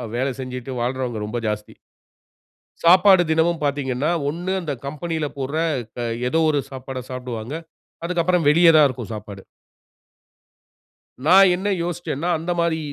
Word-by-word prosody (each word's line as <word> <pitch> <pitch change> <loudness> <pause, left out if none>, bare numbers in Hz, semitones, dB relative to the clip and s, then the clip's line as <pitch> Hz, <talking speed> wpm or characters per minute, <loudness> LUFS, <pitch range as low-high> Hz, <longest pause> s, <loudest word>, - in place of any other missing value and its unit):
வேலை 130 +2 -1
செஞ்சுட்டு 125 0 -6
வாழ்றவங்க 125 -2 -2
ரொம்ப 120 +3 -3
ஜாஸ்தி. 105 0 -4 1.1
சாப்பாடு 185 +1 +6
தினமும் 160 +1 +1
பார்த்தீங்கன்னா 140 0 -1 0.2
ஒண்ணு 175 +5 -4
அந்த 155 -4 -3
கம்பெனில 155 +2 -3
போட்ற 140 +3 -3 0.4
க 120 -1 -2 0.2
ஏதோ 160 - +1
ஒரு 145 -2 +1
சாப்பாட 130 0 -6
சாப்பிடுவாங்க. 125 -1 -6 0.5
அதுக்கு 175 0 0
அப்புறம் 175 -3 +2
வெளியே 165 +3 +6
தான் 150 - +7
இருக்கும் 120 -4 -7
சாப்பாடு. 105 -2 -8 1.8
நான் 190 +3 +7
என்ன 190 +3 -2
யோசிச்சேன்ன்னா, 175 -2 -3
அந்த 165 +3 -4
மாரி 170 -1 +1
145 Hz, 130 wpm, -22 LUFS, 125-170 Hz, 1.8 s, தான்